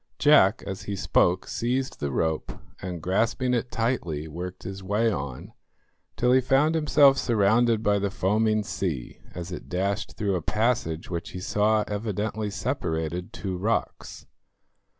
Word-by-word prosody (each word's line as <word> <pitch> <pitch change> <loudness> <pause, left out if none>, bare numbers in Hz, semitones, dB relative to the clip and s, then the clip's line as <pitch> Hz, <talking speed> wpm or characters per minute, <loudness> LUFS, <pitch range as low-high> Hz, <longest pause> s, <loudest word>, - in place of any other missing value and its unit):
Jack, 135 -7 +5
as 95 -1 -5
he 100 - -3
spoke, 90 -1 +2
seized 130 +3 -2
the 70 - -2
rope, 80 +3 -1 0.3
and 90 -3 -5
grasping 115 +7 +1
it 120 0 0
tightly 100 - -2
worked 90 +4 -7
his 95 +1 -6
way 105 +4 +1
on 70 -8 -5 0.6
till 125 +1 +3
he 130 +1 +5
found 135 +5 +3
himself 150 -3 +5
surrounded 115 0 +3
by 105 -1 +3
the 100 0 0
foaming 110 +3 +1
sea 80 -10 -4
as 90 0 -6
it 90 - -7
dashed 100 +3 -1
through 100 -2 0
a 90 - -1
passage 105 -6 -1
which 85 -1 -4
he 90 - -5
saw 105 +3 +2
evidently 105 0 -2
separated 85 -3 -3
two 95 -3 -4
rocks. 105 +6 -2
100 Hz, 150 wpm, -26 LUFS, 90-115 Hz, 0.6 s, Jack